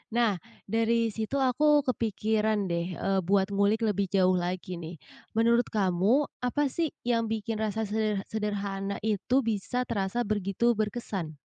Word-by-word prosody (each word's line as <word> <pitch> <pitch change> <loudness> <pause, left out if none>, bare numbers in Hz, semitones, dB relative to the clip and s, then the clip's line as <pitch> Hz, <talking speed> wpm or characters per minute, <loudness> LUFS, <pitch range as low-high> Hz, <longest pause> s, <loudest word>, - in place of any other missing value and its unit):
Nah, 220 -7 +2 0.2
dari 230 0 +1
situ 220 +5 -3
aku 290 +2 +3
kepikiran 215 -3 0
deh, 170 +1 -2
eee, 195 +2 0
buat 190 +2 +1
ngulik 200 +3 +2
lebih 200 -2 +1
jauh 185 -1 +3
lagi 180 0 -2
nih. 170 +1 -7 0.4
Menurut 235 +1 +3
kamu 205 +7 +2
apa 270 +2 0
sih 330 -4 -2
yang 230 -2 +1
bikin 220 0 -3
rasa 220 0 -1
seder 210 -1 -1
sederhana 200 -2 -2
itu 220 +5 +1
bisa 230 +3 -1
terasa 230 0 -1
begitu 210 +2 +1
berkesan? 210 -7 -3
215 Hz, 140 wpm, -28 LUFS, 195-230 Hz, 0.4 s, aku